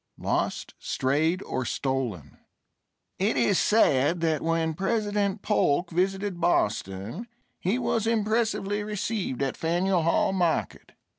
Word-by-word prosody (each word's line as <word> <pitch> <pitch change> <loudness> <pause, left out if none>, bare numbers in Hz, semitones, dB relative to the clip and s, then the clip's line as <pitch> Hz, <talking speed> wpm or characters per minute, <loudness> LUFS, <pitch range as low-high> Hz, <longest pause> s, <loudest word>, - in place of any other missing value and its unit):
LOST, - - -2
STRAYED 160 +8 0
OR 130 - -3
STOLEN 120 - -3 0.8
It 200 +4 +1
is 200 - +3
said 170 -6 +3
that 160 -2 +1
when 165 0 0
President 205 +1 -1
Polk 175 -5 +1
visited 190 +1 -1
Boston 105 - -1 0.3
he 195 +7 0
was 230 -3 0
impressively 220 -2 0
received 205 - -2
at 135 - -1
Faneuil 175 +2 +1
Hall 170 +3 +2
Market. 175 -4 -1
180 Hz, 115 wpm, -26 LUFS, 150-205 Hz, 0.8 s, is